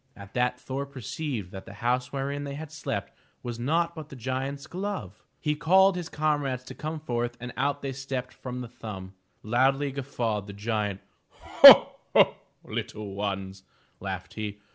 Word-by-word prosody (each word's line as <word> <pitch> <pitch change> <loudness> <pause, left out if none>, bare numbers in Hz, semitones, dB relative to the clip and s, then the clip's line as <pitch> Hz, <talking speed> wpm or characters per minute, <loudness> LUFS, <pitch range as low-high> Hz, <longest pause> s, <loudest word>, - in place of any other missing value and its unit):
At 100 0 -12
that 125 0 +1
Thor 135 +2 -4
perceived 130 - -5
that 95 - -9
the 100 - -9
house 125 +3 0
wherein 140 +1 -2
they 140 -1 -5
had 155 +1 -7
slept 160 - -4 0.3
was 120 -1 -5
naught 165 +7 +1
but 155 -2 -8
the - - -9
giant's 135 +3 -3
glove! 180 - -5 0.2
He 150 - 0
called 185 +5 +5
his 175 -2 -4
comrades 145 -4 0
to 130 - -9
come 155 +1 -4
forth 120 -4 -2
and 125 0 -7
out 140 +3 0
they 135 -1 -2
stepped 130 -1 -4
from 125 -1 -6
the 125 - -6
thumb! 95 -5 -8 0.3
Loudly 135 +5 +2
guf 140 -1 -4
fawed 110 -6 -2
the 100 - -7
giant. 105 -1 -2 0.3
"Ho, - - +9 0.2
ho! - - +6 0.3
little 105 -2 -5
ones!" 95 -1 -3 0.4
laughed 95 -1 -5
he. 105 -2 -4
125 Hz, 170 wpm, -27 LUFS, 105-145 Hz, 0.4 s, Ho